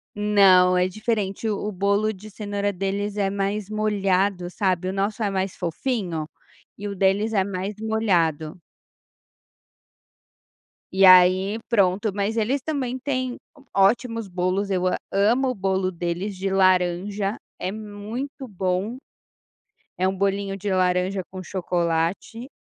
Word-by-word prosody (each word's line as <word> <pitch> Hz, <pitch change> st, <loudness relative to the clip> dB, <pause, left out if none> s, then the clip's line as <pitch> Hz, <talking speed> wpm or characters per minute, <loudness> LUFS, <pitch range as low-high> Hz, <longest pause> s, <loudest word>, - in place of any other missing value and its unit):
Não, 195 Hz, -3 st, +5 dB
é 180 Hz, 0 st, +3 dB
diferente. 215 Hz, +1 st, -2 dB
O 205 Hz, -, -1 dB
o 210 Hz, -, -2 dB
bolo 200 Hz, +3 st, +1 dB
de 205 Hz, +2 st, -12 dB
cenoura 205 Hz, -1 st, -2 dB
deles 200 Hz, +2 st, -3 dB
é 200 Hz, -1 st, +1 dB
mais 200 Hz, 0 st, -2 dB
molhado, 195 Hz, -3 st, 0 dB
sabe. 185 Hz, -1 st, 0 dB
O -, -, -3 dB
nosso 205 Hz, +3 st, -1 dB
é 205 Hz, -, 0 dB
mais 190 Hz, 0 st, -2 dB
fofinho 175 Hz, -3 st, -3 dB, 0.5 s
e 205 Hz, +1 st, -5 dB
o 200 Hz, -, -5 dB
deles 200 Hz, +4 st, +1 dB
é 195 Hz, -, +3 dB
mais 195 Hz, +1 st, -4 dB
molhado. 180 Hz, -8 st, 0 dB, 2.3 s
E 190 Hz, +1 st, +5 dB
aí, 185 Hz, +3 st, +6 dB
pronto, 200 Hz, -1 st, +2 dB
mas 205 Hz, +3 st, -1 dB
eles 250 Hz, +5 st, +1 dB
também 260 Hz, -4 st, -3 dB
têm 255 Hz, -2 st, -2 dB, 0.2 s
o 280 Hz, -, -19 dB
ótimos 230 Hz, +3 st, +2 dB
bolos. 185 Hz, +2 st, -1 dB
Eu 185 Hz, -1 st, +1 dB
a 185 Hz, -, +1 dB
amo 230 Hz, +7 st, +2 dB
o 255 Hz, -, -2 dB
bolo 190 Hz, -1 st, 0 dB
deles 175 Hz, +3 st, -3 dB
de 195 Hz, +1 st, -2 dB
laranja. 190 Hz, +2 st, +1 dB, 0.2 s
É 185 Hz, -, -2 dB
muito 220 Hz, +6 st, -6 dB
bom! 190 Hz, +4 st, -2 dB, 1.0 s
É 185 Hz, -, +2 dB
um 190 Hz, 0 st, -2 dB
bolinho 195 Hz, 0 st, -1 dB
de 200 Hz, +1 st, -3 dB
laranja 185 Hz, +1 st, +1 dB
com 185 Hz, 0 st, -7 dB
chocolate. 175 Hz, +6 st, -2 dB
195 Hz, 140 wpm, -24 LUFS, 185-215 Hz, 2.3 s, aí